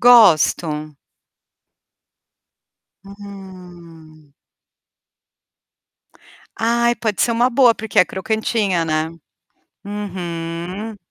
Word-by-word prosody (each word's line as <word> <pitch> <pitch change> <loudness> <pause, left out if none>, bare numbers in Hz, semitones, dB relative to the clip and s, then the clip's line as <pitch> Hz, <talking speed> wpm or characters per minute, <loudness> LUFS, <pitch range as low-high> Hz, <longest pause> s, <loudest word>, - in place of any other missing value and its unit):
Gosto. 160 - +4 2.1
Hum. 180 -6 -13 2.2
Ai 235 +1 +2
pode 215 -3 -2
ser 235 - +2
uma 240 +2 +2
boa, 245 -2 +5
porque 220 -1 -3
é - - +8
crocantinha, 200 -2 -1
né. 155 0 -1 0.7
Uhum. 185 0 -5
190 Hz, 65 wpm, -19 LUFS, 165-220 Hz, 2.2 s, é